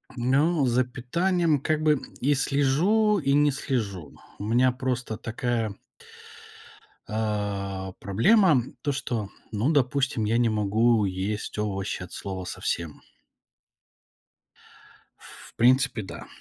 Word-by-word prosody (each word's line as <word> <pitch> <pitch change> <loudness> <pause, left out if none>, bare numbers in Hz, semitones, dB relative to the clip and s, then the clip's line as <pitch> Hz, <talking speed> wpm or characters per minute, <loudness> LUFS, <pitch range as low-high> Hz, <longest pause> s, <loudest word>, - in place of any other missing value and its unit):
Ну, 140 +5 +2
за 125 +1 +3
питанием 160 +6 0
как 155 +2 0
бы 150 -3 +3 0.2
и 145 +3 +3
слежу, 170 +11 +2
и 140 -3 +1
не 145 0 +4
слежу. 100 - -3 0.3
У - - -5
меня 125 +3 +3
просто 125 -3 -3
такая 115 -2 -2 1.3
а, 100 -3 -3
проблема 145 - +4 0.2
то, 145 - 0
что, 115 -6 -3 0.2
ну, 110 +9 +1
допустим, 135 -4 +1
я 115 +2 +1
не 120 -2 +3
могу 110 +1 +2
есть 100 +3 -3
овощи 95 -3 -2
от 90 - -8
слова 95 -2 -6
совсем. 85 -3 -4 2.5
В - - -19
принципе, 130 -1 +3
да. 95 - -9
120 Hz, 115 wpm, -26 LUFS, 105-140 Hz, 2.5 s, не